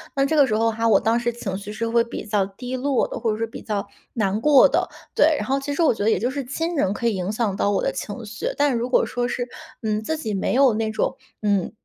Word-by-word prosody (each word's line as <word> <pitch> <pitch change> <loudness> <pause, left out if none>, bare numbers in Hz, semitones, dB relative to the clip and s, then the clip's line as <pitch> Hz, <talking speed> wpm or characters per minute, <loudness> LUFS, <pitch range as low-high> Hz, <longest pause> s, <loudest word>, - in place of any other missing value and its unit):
那 275 0 +3
这 315 - 0
个 285 -3 +5
时 215 - 0
候 225 +1 +2
哈， 230 +1 0
我 225 - +5
当 230 +1 +2
时 240 0 0
情 205 -5 -5
绪 200 +1 -6
是 230 +2 -3
会 230 0 +3
比 235 - -7
较 205 -2 +1
低 245 +6 -6
落 265 +1 +1
的， - - -6
或 225 -2 0
者 215 - -2
是 225 - -1
比 225 - -10
较 205 -2 -3 0.3
难 210 -2 0
过 290 0 +7
的。 - - 0 0.2
对， 310 +1 +4
然 - - -3
后 270 +1 +1
其 275 +1 -4
实 335 - +2
我 310 - +4
觉 205 - -4
得 215 - +3
也 220 - +3
就 245 +7 -1
是 280 0 -3
亲 325 +7 -3
人 195 -10 +1
可 235 - -5
以 230 - +2
影 185 +2 -2
响 215 -3 -1
到 200 - +1
我 200 -2 +1
的 - - +1
情 215 +2 -6
绪。 215 +1 -5
但 285 -3 +2
如 235 +2 -2
果 - - +3
说 245 0 -2
是， 245 0 -3 0.4
嗯， 215 -1 0
自 315 +8 -2
己 220 -8 -3
没 195 - -1
有 265 -4 +5
那 220 0 -1
种， 220 +4 -1 0.3
嗯 200 -3 +1
230 Hz, 310 characters per minute, -23 LUFS, 210-260 Hz, 0.4 s, 过